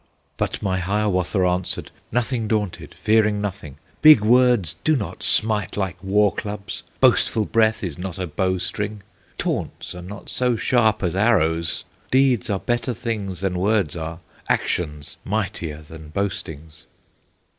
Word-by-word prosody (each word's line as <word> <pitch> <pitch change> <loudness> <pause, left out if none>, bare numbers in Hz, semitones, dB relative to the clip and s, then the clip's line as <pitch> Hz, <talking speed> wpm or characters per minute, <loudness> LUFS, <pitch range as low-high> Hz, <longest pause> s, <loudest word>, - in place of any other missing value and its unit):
But - - -2
my 95 -2 0
Hiawatha 95 -1 +1
answered, 90 0 -1 0.2
Nothing 120 -1 0
daunted, 105 -4 -2
fearing 105 -1 +2
nothing: 95 -8 -5 0.2
"Big 155 -7 +9
words 120 -5 +4
do 155 - +3
not 110 -8 -4
smite 105 -3 +2
like 95 -3 -1
war 100 +1 +3
clubs, 105 -1 -5 0.2
Boastful 110 -2 +3
breath 110 0 +2
is 85 -5 -4
not 90 -2 -5
a 95 - -2
bow 95 +3 0
string, 100 +3 -4 0.3
Taunts - - -3
are 90 - -8
not 100 +3 -9
so 125 -1 +1
sharp 110 -3 +2
as 90 -1 0
arrows, 85 -6 +2 0.3
Deeds 130 -3 +3
are 100 - +1
better 120 +2 -1
things 105 -6 -4
than 90 -2 -1
words 100 -5 +1
are, 80 0 -5 0.3
Actions 75 -4 -1
mightier 90 -7 -3
than 80 0 -11
boastings!" 80 -4 -5
100 Hz, 140 wpm, -22 LUFS, 90-110 Hz, 0.3 s, Big